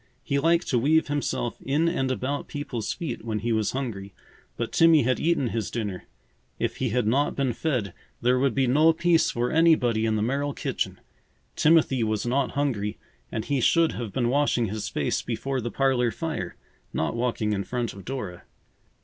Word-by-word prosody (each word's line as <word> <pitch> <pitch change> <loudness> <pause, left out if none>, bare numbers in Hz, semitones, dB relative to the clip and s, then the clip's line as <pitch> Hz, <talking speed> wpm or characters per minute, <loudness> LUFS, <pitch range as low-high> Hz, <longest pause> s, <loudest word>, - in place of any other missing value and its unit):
He 140 - 0
liked 165 +3 +2
to 125 - +2
weave 155 +5 +3
himself 145 -5 -2
in 150 +5 +1
and 135 -6 0
about 130 +2 -2
people's 135 -6 -4
feet 155 - -5
when 110 -2 -2
he 115 +3 -2
was 110 -2 +1
hungry, 100 -8 -4 0.4
but - - -3
Timmy 165 -3 +5
had 130 +2 +1
eaten 160 -7 +1
his 110 -3 -2
dinner. 105 -6 -4 0.5
If - - -2
he 130 - -1
had 120 +1 0
not 135 +7 +1
been 135 -3 0
fed, 120 - -2 0.3
there 125 +1 +2
would 135 -3 +1
be 135 - +3
no 155 +6 +5
peace 170 0 +3
for 120 +1 -1
anybody 125 -9 +3
in 110 - +1
the 105 - 0
Merrill 140 +4 -1
kitchen. - - -3 0.6
Timothy 150 -6 +4
was 110 0 -1
not 130 +2 0
hungry 120 -8 -1 0.3
and 110 - -3
he 140 -3 0
should 165 +5 +4
have 115 -4 -5
been 120 0 0
washing 125 -5 +2
his 105 +1 -4
face - - -1
before 135 -1 -3
the 120 - -3
parlor 130 -2 +2
fire, 115 - -4 0.4
not 80 - -1
walking 115 -3 0
in 100 -1 -1
front 120 -1 -3
of 100 - -11
Dora. 105 -10 -5
125 Hz, 185 wpm, -26 LUFS, 115-145 Hz, 0.6 s, Timmy